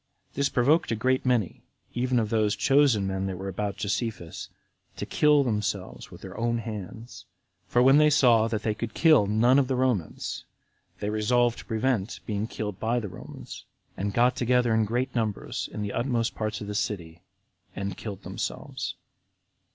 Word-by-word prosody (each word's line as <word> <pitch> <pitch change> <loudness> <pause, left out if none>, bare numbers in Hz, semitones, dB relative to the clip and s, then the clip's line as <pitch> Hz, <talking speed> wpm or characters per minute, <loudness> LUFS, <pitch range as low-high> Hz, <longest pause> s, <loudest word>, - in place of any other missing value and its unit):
This 140 +1 +1
provoked 140 +6 +2
a - - +1
great 130 +4 +1
many, 120 -8 +1 0.3
even 125 +1 0
of 110 -3 0
those 110 -2 +2
chosen 120 0 +3
men 95 0 -2
that 95 -1 -4
were 95 +2 -6
about 100 +1 -3
Josephus, 105 -4 -3 0.5
to - - -3
kill 150 -1 +4
themselves 105 -5 -3
with - - -13
their - - -9
own 115 0 +1
hands; 110 0 -7 0.4
for 125 - +3
when 135 +2 +7
they 150 0 +6
saw 120 -6 +5
that 110 -2 -3
they 110 - +1
could 110 +1 -6
kill 155 -11 +5
none 120 +6 +4
of 135 - +1
the 130 - 0
Romans, 125 - -1 0.6
they 105 - -1
resolved 120 +3 +2
to - - -10
prevent 115 -2 -1
being 105 -1 -2
killed 105 -4 -5
by 115 +2 +1
the 105 -4 -5
Romans, - - -10 0.3
and 100 +1 -2
got 120 +3 +3
together 125 -1 +2
in 110 -1 +3
great 120 +5 -1
numbers 110 -4 -2
in 105 - -4
the 100 - -4
utmost 120 -1 0
parts 110 0 -3
of - - -4
the 105 - -4
city, 85 -5 -3 0.5
and 100 -1 -3
killed 100 -4 -7
themselves. - - -4
115 Hz, 175 wpm, -27 LUFS, 105-125 Hz, 0.6 s, when